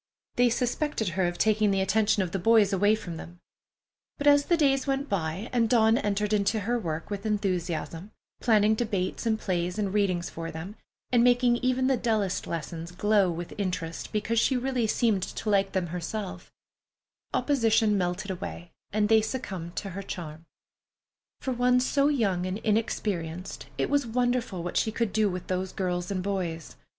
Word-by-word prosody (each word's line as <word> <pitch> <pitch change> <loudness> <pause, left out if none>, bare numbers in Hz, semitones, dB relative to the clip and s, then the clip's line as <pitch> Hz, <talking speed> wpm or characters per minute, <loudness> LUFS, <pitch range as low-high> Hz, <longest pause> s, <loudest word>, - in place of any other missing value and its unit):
They 245 0 +4
suspected 245 - -1
her 180 +2 0
of 175 0 -3
taking 215 0 +3
the 195 -1 +1
attention 205 +1 +2
of 175 - -5
the 195 - -2
boys 215 0 +4
away 205 +3 +4
from 175 -6 -7
them; 175 +2 -10 0.8
but 285 - -4
as 285 0 +6
the 345 - +2
days 275 -3 +2
went 275 +1 0
by, 180 +3 -2
and 230 -2 +2
Dawn 225 -2 +5
entered 210 -2 0
into 210 +1 +1
her 240 +4 0
work 165 -2 -4
with 200 -1 -3
enthusiasm, 185 -4 -2 0.3
planning 215 -2 +4
debates 215 -1 -2
and 220 -1 +1
plays 180 0 -2
and 200 -2 -1
readings 185 -4 +1
for 165 0 -6
them, 165 +6 -7 0.4
and 240 -2 +4
making 245 0 +4
even 255 +1 +1
the 265 -1 +3
dullest 215 -6 0
lessons 165 0 -5
glow 205 +1 +2
with 170 0 -5
interest 180 -4 -3
because 215 +2 0
she 260 +2 +2
really 250 -2 0
seemed 215 -3 +2
to 215 - -4
like 195 -1 +2
them 190 -2 0
herself, 180 +2 -5 0.8
opposition 225 -6 +2
melted 185 +1 -1
away 175 -1 -7 0.2
and 210 0 +2
they 220 0 +5
succumbed 190 -8 -5
to 195 - -4
her 195 +2 -5
charm. 165 -4 -7 0.9
For 260 - -2
one 250 0 +3
so 280 +2 +2
young 200 -11 +1
and 185 +2 -2
inexperienced, 195 -6 -2
it - - +1
was 285 -3 +1
wonderful 245 -6 0
what 175 - -3
she 220 - +1
could 225 -2 -1
do 215 -1 +3
with 180 -1 -5
those 185 0 -2
girls 180 -1 -2
and 190 -2 -2
boys. 180 -5 -3
205 Hz, 175 wpm, -27 LUFS, 180-230 Hz, 0.9 s, as